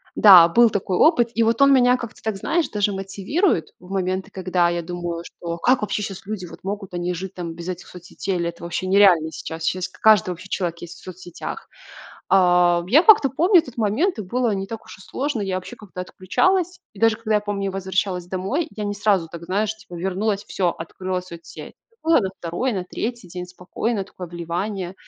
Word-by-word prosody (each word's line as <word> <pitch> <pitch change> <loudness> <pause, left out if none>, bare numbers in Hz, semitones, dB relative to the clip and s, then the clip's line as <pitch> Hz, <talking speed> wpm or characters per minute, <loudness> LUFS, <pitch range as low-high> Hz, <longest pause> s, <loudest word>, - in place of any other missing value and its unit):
Да, 185 -5 +9
был 235 +6 +5
такой 190 -2 -1
опыт, 240 - +4
и 230 - +3
вот 230 +4 +1
он 275 0 +7
меня 250 -1 +5
как-то 235 -3 -8
так, 220 -1 -1
знаешь, 325 - 0
даже 205 -1 0
мотивирует 195 - -1
в 180 - -16
моменты, 190 0 -2
когда 185 -2 +1
я 175 0 -1
думаю, 175 0 -5
что: 170 -1 -7
"Как 250 +6 +3
вообще 210 0 -2
щас 195 -2 -6
люди 205 -3 -5
вот 170 - -12
могут, 195 -1 -5
они 175 0 -2
и - - -2
жить 185 +2 -6
там 170 -2 -5
без 170 +1 -7
этих 180 0 -6
соцсетей? 180 +2 -5
Или 170 -1 -1
это 170 0 -11
вообще 175 +2 -3
нереально 185 -5 +5
сейчас?" 160 +2 -7
Щас 180 +1 -1
к - - -21
каждый 215 -5 +5
вообще 190 +2 -9
человек 170 -3 -2
есть 175 - -9
в - - -19
соцсетях. 180 -1 -8 0.6
А, 175 -2 +4
я 285 - +6
как-то 395 - +7
помню 350 - +5
этот 255 -7 -13
момент, 230 - +1
и - - -2
было 240 +5 0
не 195 0 -3
так 225 +2 -7
уж - - -12
и - - -17
сложно. 270 +4 -3
Я 195 -2 -2
вообще 185 +6 -7
как-то 195 -4 -9
отключалась. 360 - 0
И 200 - -16
даже 225 -1 +4
когда 220 -1 -2
я - - +1
помню, 205 -1 -3
я - - -1
возвращалась 190 -1 -2
домой, 195 - -2
я 210 - -3
не 205 - -2
сразу 200 -5 +1
так, 170 0 -9
знаешь, 205 +4 -1
типа 215 -5 -13
вернулась 195 +4 -1
и - - -34
всё, 185 -2 0
открыла 185 +3 -4
соцсеть. 170 -2 -11 0.3
Было 325 -3 +4
на 195 - -1
2, 175 +10 -2
на 185 -3 -3
3 235 +2 -5
день 180 +1 -6
спокойное 195 +4 -3
такое 185 -2 -10
вливание. 175 +3 -4
190 Hz, 215 wpm, -22 LUFS, 180-220 Hz, 0.6 s, Да